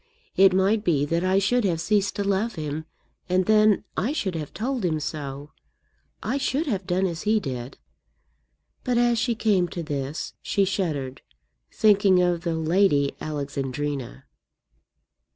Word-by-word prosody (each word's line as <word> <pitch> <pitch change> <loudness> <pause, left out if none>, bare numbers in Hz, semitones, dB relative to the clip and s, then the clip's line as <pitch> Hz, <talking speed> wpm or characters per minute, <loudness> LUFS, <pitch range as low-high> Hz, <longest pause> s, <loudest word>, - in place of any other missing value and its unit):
It 195 0 +6
might 195 +3 +2
be 150 -7 +2
that 165 +4 -1
I 185 +1 +2
should 230 +5 +2
have 175 -5 0
ceased 200 +3 +1
to 200 - -1
love 200 +3 0
him, 155 0 -4 0.4
and 185 0 +2
then 215 0 +4
I 240 +10 0
should 195 - -2
have 155 -3 -5
told 250 +1 -3
him 160 -3 0
so. 145 -1 -6 0.7
I 275 - -1
should 280 +3 0
have 200 - -2
done 185 +1 +1
as 170 -3 -3
he 215 +1 +2
did." 130 -7 -6 1.1
But, 250 -2 0
as 240 -1 +3
she 235 0 0
came 205 -5 +2
to 170 -1 -5
this, 145 -1 -4
she 200 - +1
shuddered, 150 -9 -2 0.5
thinking 200 -3 +4
of 175 -1 +1
the 170 -2 -2
Lady 160 -3 +2
Alexandrina. 140 -2 -4
185 Hz, 150 wpm, -25 LUFS, 150-210 Hz, 1.1 s, It